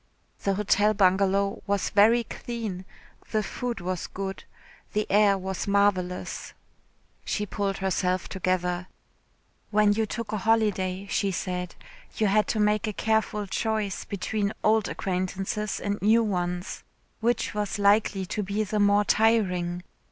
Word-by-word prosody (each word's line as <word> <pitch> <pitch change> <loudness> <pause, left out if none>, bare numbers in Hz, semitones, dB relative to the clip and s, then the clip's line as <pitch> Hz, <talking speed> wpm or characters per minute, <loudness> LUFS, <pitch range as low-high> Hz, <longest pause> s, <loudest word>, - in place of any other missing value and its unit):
The 195 -1 +1
Hotel 210 +1 +2
Bungalow 195 +1 +2
was 200 -1 0
very 225 +4 +5
clean, 220 -5 -5 0.4
the 215 -1 0
food 240 +3 -4
was 180 0 -3
good, 195 0 -6 0.5
the 210 0 +1
air 205 -1 +5
was 190 0 -4
marvellous.... 200 -3 0 0.7
She 210 - -2
pulled 200 -1 -2
herself 185 -1 0
together. 180 -1 -1 0.8
When 210 -1 +4
you 220 +1 0
took 230 0 -5
a 215 - -1
holiday, 200 -3 +1
she 200 0 0
said, 180 -1 -3 0.4
you 220 - +2
had 210 +1 +3
to 220 - -1
make 210 +1 +2
a 215 - -2
careful 220 -1 0
choice 215 -1 -2
between 205 +1 -2
old 220 -1 +3
acquaintances 195 +3 -2
and 205 0 -3
new 225 +3 +4
ones. 180 -3 -3 0.4
Which 235 +1 0
was 210 -1 -2
likely 200 -1 +3
to 210 - -3
be 200 +2 -1
the 210 +1 -2
more 205 0 +4
tiring? 180 -6 +2
200 Hz, 135 wpm, -26 LUFS, 190-215 Hz, 0.8 s, very